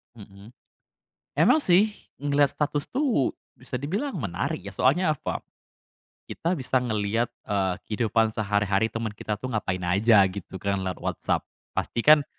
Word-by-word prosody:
Mhm. 100 +2 -14 0.9
Emang 310 - +5
sih, 200 +4 +4 0.2
ngelihat 145 0 +2
status 145 0 -2
tuh, 255 - +1 0.2
bisa 125 0 -6
dibilang 200 - -2
menarik 95 -9 -2
ya, 100 +1 -9
soalnya 155 +4 +3
apa, - - -4 0.9
kita 170 +2 -2
bisa 130 -1 +1
ngelihat, 115 0 0 0.2
eee, 95 -3 0
kehidupan 110 0 +1
sehari-hari 105 0 +1
teman 115 -2 -4
kita 105 0 -4
tuh 130 +5 -6
ngapain 95 -4 -2
aja, 100 +3 +5
gitu 95 0 -8
kan 100 +1 -1
lewat 95 -1 -3
WhatsApp. - - -1 0.3
Pastikan, 145 +5 +4
115 Hz, 135 wpm, -26 LUFS, 100-145 Hz, 0.9 s, Emang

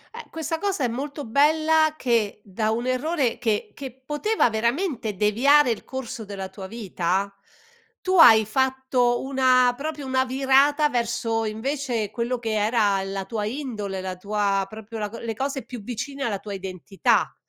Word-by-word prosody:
Eh, 470 - -8
questa 320 0 -3
cosa 390 -5 -1
è - - +3
molto 280 +5 -5
bella 310 +5 +3
che 230 -7 0
da 215 +2 -2
un 230 +2 -1
errore 255 -1 0
che 215 -3 -1
che 270 -2 -7
poteva 300 - +1
veramente 235 - -1
deviare 245 +7 +4
il 225 - -4
corso 260 -2 -6
della 195 -2 -6
tua 190 0 -9
vita, 195 -2 -2 0.7
tu 375 0 0
hai 220 -7 +8
fatto 260 0 +1
una 255 -2 +3
proprio 295 +1 -5
una 260 0 +1
virata 275 +3 +3
verso 230 -2 -1
invece 230 -1 -2
quello 240 +2 -2
che 230 -2 -4
era 210 -2 +2
la 195 0 -4
tua 210 +1 -3
indole, 215 -6 -4
la 185 0 -4
tua 200 0 0
proprio 220 +1 -8
la 210 -1 -2
co 230 - -9
le 230 -1 -4
cose 270 +3 -3
più 245 -3 -8
vicine 250 +6 -5
alla 220 -6 -1
tua 200 +1 -8
identità. 190 0 -1
240 Hz, 160 wpm, -24 LUFS, 210-275 Hz, 0.7 s, hai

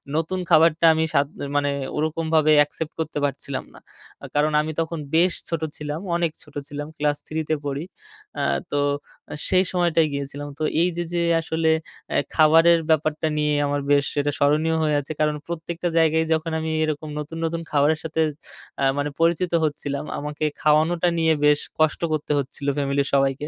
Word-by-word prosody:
নতুন 165 +4 -1
খাবারটা 165 0 +5
আমি 160 0 +1
স্বাদ 140 0 +3 0.3
মানে 145 0 +1 0.3
ওরকমভাবে 155 0 +1
অ্যাকসেপ্ট 150 +2 0
করতে 155 -2 -3
পারছিলাম 140 -1 -4
না। - - -14 0.4
আ - - -6
কারণ 150 +1 +3
আমি 155 +1 -3
তখন 165 0 -4 0.2
বেশ 175 +2 +4 0.2
ছোট 165 -2 -2 0.2
ছিলাম, 150 +1 -4 0.2
অনেক 170 -2 +1
ছোট 150 - -19
ছিলাম 145 +1 -6
ক্লাস 145 0 +1
3 160 0 -2
তে 155 - +3
পড়ি। 140 +1 -3 0.6
আ - - 0 0.3
তো 145 - +1 0.5
অ্যা - - -7
সেই 185 0 +4
সময়টায় 170 -3 +2
গিয়েছিলাম। 140 +1 -5
তো - - -2 0.2
এই 180 - +3
যে 175 - 0
যে 170 - +1 0.2
আসলে 160 0 0 0.4
অ্যা - - +2 0.2
খাবারের 165 +2 +6
ব্যাপারটা 155 0 +1
নিয়ে 150 0 +1
আমার 145 0 -1
বেশ 140 -1 +4 0.2
এটা 145 0 0
স্মরণীয় 155 +3 +2
হয়ে 150 -1 +2
আছে। 145 - -9
কারণ 150 0 +2
প্রত্যেকটা 170 +1 -4
জায়গায় 160 0 +3
যখন 160 +1 -1
আমি 160 0 -3
এরকম 155 0 -3
নতুন, 150 +2 -6
নতুন 165 +1 -2
খাবারের 150 +2 +3
সাথে 160 0 -1 0.6
অ্যা 135 - +1
মানে 145 +1 0
পরিচিত 170 +1 +2
হচ্ছিলাম, 145 -2 -3
আমাকে 150 +1 -5 0.2
খাওয়ানোটা 160 +3 +3
নিয়ে 160 -1 +3
বেশ 150 0 +5 0.2
কষ্ট 155 -1 +2
করতে 150 -1 -2
হচ্ছিলো 140 +1 -4
ফ্যামিলির 140 0 0
সবাইকে। 135 +1 +1
155 Hz, 175 wpm, -23 LUFS, 145-160 Hz, 0.6 s, খাবারের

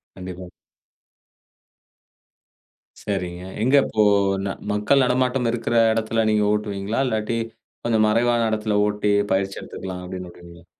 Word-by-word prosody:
கண்டிப்பா. 90 -1 -8 2.5
சரிங்க. 90 -3 -4 0.2
எங்க 130 +4 +3
இப்போ 110 -1 +1 0.4
ந - - -1 0.2
மக்கள் 105 +7 +3
நடமாட்டம் 125 0 +1
இருக்கற 120 0 -2 0.2
இடத்தில 110 0 0
நீங்க 105 -1 +2
ஓட்டுவீங்களா? 105 +1 -2
இல்லாட்டி 110 0 -1 0.5
கொஞ்சம் 110 -2 +3
மறைவான 115 +1 +2
இடத்தில 105 -1 0
ஓட்டி 105 0 0 0.2
பயிற்சி 95 0 -1
எடுத்துக்கலாம் 90 -1 -7
அப்படின்னு 90 0 -7
விடுவீங்களா? 85 0 -15
105 Hz, 110 wpm, -22 LUFS, 95-115 Hz, 2.5 s, எங்க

